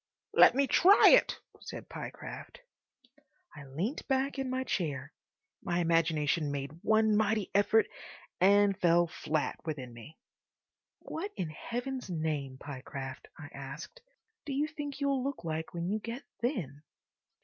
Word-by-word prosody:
"Let - - +7
me 280 +1 +3
try 380 +8 +7
it," - - +5 0.2
said - - -8
Pyecraft. - - -8 0.9
I 140 - -10
leant 170 - -4
back 270 +1 0
in 265 -1 -2
my 260 0 -1
chair. 145 - -3 0.5
My 175 - -1
imagination 165 -2 +2
made 140 -1 -4
one 220 0 +3
mighty 215 -1 +1
effort 205 +2 +4 0.5
and 200 +1 +5
fell 175 -1 +4
flat 155 -2 -2
within 135 -6 -5
me. 120 +7 -12 0.8
"What 380 +6 -5
in 170 -5 -3
Heaven's 245 - -5
name, 155 -6 -2
Pyecraft," 135 -1 -7
I 145 -2 -9
asked, 140 - -8 0.4
"do 280 - -4
you 285 +3 +1
think 295 -2 -6
you'll 275 -2 +1
look 275 -10 -4
like 160 -1 -3
when 170 0 -3
you 210 +3 0
get 230 +4 -6 0.2
thin?" 170 - -2
175 Hz, 140 wpm, -31 LUFS, -, 0.9 s, Let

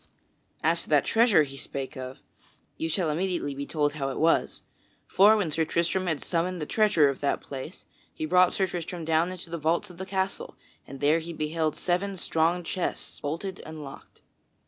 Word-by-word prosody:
As - - +2
to - - -8
that - - +4
treasure 225 -8 +5
he 135 -1 -8
spake 135 0 -6
of, 130 0 -8 0.5
ye 160 - -2
shall 165 -1 +1
immediately 170 -3 -1
be 140 +1 -5
told 145 -2 0
how 140 -2 -2
it 135 - -4
was. 165 +1 +2 0.4
For 210 +3 +6
when 185 -7 0
Sir 160 +2 +1
Tristram 170 +3 0
had 160 -4 -1
summoned 180 +1 -1
the 150 - -3
treasurer 205 -7 +4
of 135 - -4
that 140 - 0
place, 140 +6 -8 0.3
he 155 - -4
brought 180 +2 +4
Sir 190 - +2
Tristram 175 -1 -5
down 165 +2 +2
into 180 -2 -8
the 170 - -3
vaults 170 +5 0
of 175 - -15
the 190 - -5
castle 190 0 -2 0.3
and 135 +1 -9
there 150 +3 +4
he 165 +1 -7
beheld 155 0 -1
seven 190 +2 -1
strong 170 +1 +1
chests 175 +2 -4
bolted 170 +6 -4
and 155 -1 -8
locked. 135 -1 -12
165 Hz, 190 wpm, -27 LUFS, 150-185 Hz, 0.5 s, For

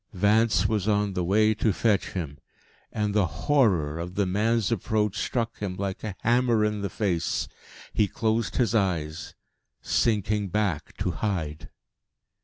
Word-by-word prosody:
Vance 105 +4 +3
was 105 -3 -1
on 105 -2 +1
the 90 - -1
way 105 +4 +3
to 110 0 +1
fetch 100 0 +1
him. 75 -6 -5 0.5
And 105 -1 -1
the 100 -3 +3 0.2
horror 95 - +2
of 90 +2 -6
the 100 - +1
man's 110 +4 +1
approach 105 -1 0
struck 115 +1 -2
him 95 -3 -3
like 95 0 -4
a 105 -4 -4
hammer 120 -2 +3
in 105 -1 -1
the 100 - -2
face. 90 -3 -1 0.5
He 105 - +2
closed 110 -3 -1
his 120 -4 +1
eyes, 85 -7 -1 0.4
sinking 105 -2 +1
back 90 -5 -2
to 90 - -1
hide. 80 -6 -3
105 Hz, 150 wpm, -26 LUFS, 90-110 Hz, 0.5 s, Vance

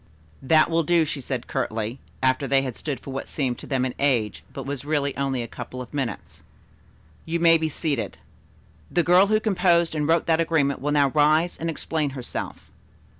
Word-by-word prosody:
"That 155 +4 +4
will 165 0 +3
do," 165 0 +3
she 145 -2 -4
said 125 -2 -4
curtly, 110 +3 -3 0.2
after 130 +1 +2
they 135 0 +3
had 130 -4 -4
stood 145 -6 -4
for 135 - -9
what 135 - -5
seemed 130 -5 -2
to - - -10
them 130 -2 0
an 130 - -3
age, 125 -7 0
but - - -7
was 140 -1 -4
really 145 -2 -1
only 135 -3 -1
a - - -6
couple 125 - -8
of 125 +1 -8
minutes. 130 -7 -4 0.8
"You 170 +1 -2
may 165 -1 +5
be 160 0 -1
seated. 140 - -2 0.7
The 175 - +2
girl 180 +3 +5
who 215 +1 +3
composed 180 -6 +2
and 150 -2 -1
wrote 165 0 +3
that 165 0 +2
agreement 145 -5 +1
will 145 +2 -1
now 145 -2 +3
rise 155 +4 +3
and 165 - -3
explain 155 -1 -2
herself." 125 - -6
145 Hz, 195 wpm, -24 LUFS, 130-165 Hz, 0.8 s, may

